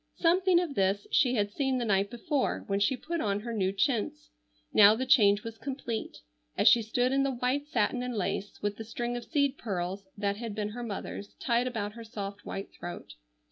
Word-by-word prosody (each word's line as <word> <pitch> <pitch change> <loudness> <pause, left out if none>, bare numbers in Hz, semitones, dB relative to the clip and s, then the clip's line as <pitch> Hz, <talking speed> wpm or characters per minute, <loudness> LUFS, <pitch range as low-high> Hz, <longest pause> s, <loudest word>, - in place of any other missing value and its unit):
Something 360 +1 +4
of 345 -5 -2
this 195 -2 +1
she 255 -4 +3
had 205 -2 0
seen 265 +2 0
the 240 - -1
night 200 -1 +2
before 260 +4 -1
when 200 -2 0
she 250 +6 +2
put 335 +5 -3
on 205 -1 0
her 235 +1 -5
new 190 -3 +1
chintz; 270 +9 -1 0.4
now 210 0 +8
the 260 +3 -2
change 205 -5 +5
was 225 -1 -7
complete, 260 -5 -4 0.4
as - - +3
she 235 - +7
stood 245 +3 0
in 275 0 +2
the 275 - +2
white 255 +4 -1
satin 245 -2 0
and 250 -1 -3
lace 200 +1 -3
with 205 0 -1
the 225 - -5
string 240 +2 -3
of 240 - -5
seed 280 -3 +1
pearls 190 -1 -3
that 200 0 -1
had 225 -2 -5
been 210 -1 -2
her 240 +3 -6
mother's 205 -2 -6
tied 240 0 +1
about 210 -4 -3
her 230 0 -9
soft 205 -2 -7
white 195 - -5
throat. 175 - -8
230 Hz, 210 wpm, -29 LUFS, 205-260 Hz, 0.4 s, now